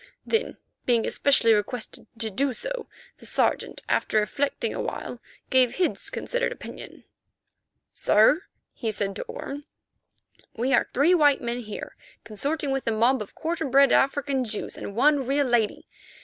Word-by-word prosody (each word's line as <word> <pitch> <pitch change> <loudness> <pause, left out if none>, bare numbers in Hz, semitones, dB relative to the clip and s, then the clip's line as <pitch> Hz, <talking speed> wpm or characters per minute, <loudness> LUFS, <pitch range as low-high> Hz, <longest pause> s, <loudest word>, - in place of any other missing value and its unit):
Then, 450 +1 -1 0.3
being 235 -2 +3
especially 260 -5 +3
requested 220 +2 -3
to 220 -1 -2
do 270 +5 0
so, - - -4 0.3
the - - -10
Sergeant, - - 0
after 215 - +2
reflecting 275 +7 -1
awhile, - - -5 0.3
gave 255 -2 +4
his 365 - 0
considered - - -2
opinion. - - -9 0.9
"Sir," 285 - +4 0.3
he 225 - -3
said 200 -2 -1
to - - -4
Orme, 380 - -7 0.9
"we 250 +4 0
are - - +3
three 295 +7 +4
white 295 -5 +5
men 240 0 -2
here 215 -3 -7 0.3
consorting 280 +7 -2
with 270 -2 -2
a - - +3
mob 235 +4 +2
of 210 - -8
quarter 330 +1 -2
bred 275 0 +5
African 275 -1 +2
Jews 215 -3 -4
and 200 - -7
one 275 +1 +3
real 280 +1 +2
lady. 235 -4 +1
265 Hz, 150 wpm, -25 LUFS, 225-285 Hz, 0.9 s, white